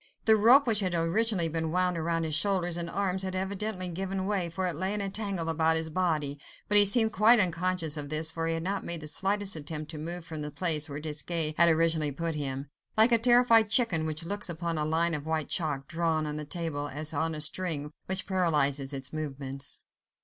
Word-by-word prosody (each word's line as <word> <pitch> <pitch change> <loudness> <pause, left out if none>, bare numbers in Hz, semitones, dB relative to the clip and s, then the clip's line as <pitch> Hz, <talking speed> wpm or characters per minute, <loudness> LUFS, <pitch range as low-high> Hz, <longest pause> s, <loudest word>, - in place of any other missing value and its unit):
The 220 - +6
rope 240 +7 +6
which 225 -4 +3
had 185 -4 -1
originally 175 +2 +1
been 160 0 -3
wound 180 -1 0
round 165 0 -1
his 155 - -3
shoulders 175 0 +1
and 170 -1 -4
arms 190 0 -1
had 190 -1 -3
evidently 190 0 -3
given 190 +2 -4
way, 190 -4 -1
for 185 +3 -3
it 180 - -2
lay 190 +6 -2
in - - -3
a 200 -1 -3
tangle 195 -5 -2
about 160 0 +1
his 160 0 -2
body, 155 -5 -1 0.3
but 210 - +1
he 205 0 +12
seemed 220 +2 +3
quite 220 +5 +5
unconscious 180 -3 -1
of 145 -1 -4
this, 155 +1 +1
for 165 0 -3
he 165 - 0
had 165 - -4
not 195 +2 -3
made 170 -1 -4
the 150 - -7
slightest 195 +5 -1
attempt 155 0 -6
to 155 - -8
move 170 +2 -5
from 160 -2 -7
the 150 - -4
place 155 0 +1
where 145 +1 -5
Desgas 155 +1 -2
had 170 +1 +5
originally 160 -2 +2
put 165 +4 -3
him: 140 -2 -4 0.3
like 220 +3 +5
a 235 - +4
terrified 235 -2 +5
chicken 195 -9 +2
which 155 +1 -3
looks 205 +1 -2
upon 170 0 -3
a 150 - -1
line 165 +2 0
of 150 0 -5
white 160 -1 -2
chalk, 145 -6 -2
drawn 165 -2 -1
on 150 0 -4
a 150 - -6
table, 145 -2 -4
as 155 +2 -3
on 160 +2 -1
a - - -5
string 155 -2 -1 0.2
which 190 0 0
paralyzes 145 -7 0
its 135 0 -5
movements. 140 -2 -3
165 Hz, 220 wpm, -28 LUFS, 155-190 Hz, 0.3 s, he